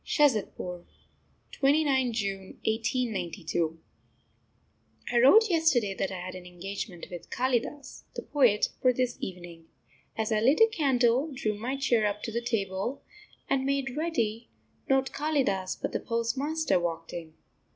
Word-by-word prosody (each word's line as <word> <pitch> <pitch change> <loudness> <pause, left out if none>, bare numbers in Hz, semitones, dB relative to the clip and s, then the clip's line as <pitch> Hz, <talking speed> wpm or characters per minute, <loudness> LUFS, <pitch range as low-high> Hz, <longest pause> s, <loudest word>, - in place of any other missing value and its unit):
SHAZADPUR, 210 - +1 0.7
29th 275 -3 +2
June 200 -3 -1 0.3
1892. 190 -8 -1 1.3
I 240 - +5
wrote 405 - +7
yesterday 315 - +2
that 190 - -2
I 190 - -5
had 185 +1 -6
an 180 -1 -9
engagement 180 0 -6
with 175 -2 -8
Kalidas, 260 +2 -2
the - - -4
poet, 245 -8 +3
for 255 - +5
this 250 0 -1
evening. 175 -3 -8 0.5
As 220 0 -1
I 215 - +3
lit 260 +7 +4
a 450 - +9
candle, 275 - +2
drew 245 -6 -1
my 235 +6 -3
chair 235 -5 +2
up 205 0 -3
to 225 - -3
the 235 +2 -1
table, 220 +1 -2 0.4
and 270 -1 +1
made 270 -1 -1
ready, 240 -9 -1 0.4
not 265 0 +2
Kalidas, 265 -11 0
but - - -3
the - - -1
postmaster, 265 - 0
walked 165 -1 -4
in. 160 -2 -7
235 Hz, 140 wpm, -28 LUFS, 195-270 Hz, 1.3 s, a